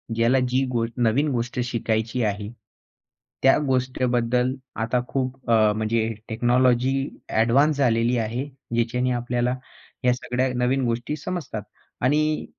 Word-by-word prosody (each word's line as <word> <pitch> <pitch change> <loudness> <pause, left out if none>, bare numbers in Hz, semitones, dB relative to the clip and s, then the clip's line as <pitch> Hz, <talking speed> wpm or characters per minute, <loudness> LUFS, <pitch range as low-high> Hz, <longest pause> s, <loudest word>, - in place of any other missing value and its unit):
ज्याला 120 +3 +3
जी 130 +2 +2
गो 115 -1 +1
नवीन 125 +5 +2
गोष्ट 125 0 -2
शिकायची 115 0 -1
आहे. 105 0 -2 0.9
त्या 135 - +6
गोष्टीबद्दल 125 -1 +1 0.3
आता 125 +2 +1
खूप 130 -2 -3
अ, 110 -2 +5
म्हणजे 110 +1 0 0.2
टेक्नॉलॉजी 125 +3 +2 0.2
ॲडवान्स 135 +7 +3
झालेली 120 -2 +2
आहे. 115 +4 -2 0.3
ज्याच्याने 125 +2 +1
आपल्याला 120 0 0 0.5
ह्या 125 0 +4
सगळ्या 125 +1 -1
नवीन 125 +2 +1
गोष्टी 120 +5 -1
समजतात. 155 - -5 0.4
आणि 150 +4 +1
125 Hz, 120 wpm, -24 LUFS, 115-130 Hz, 0.9 s, त्या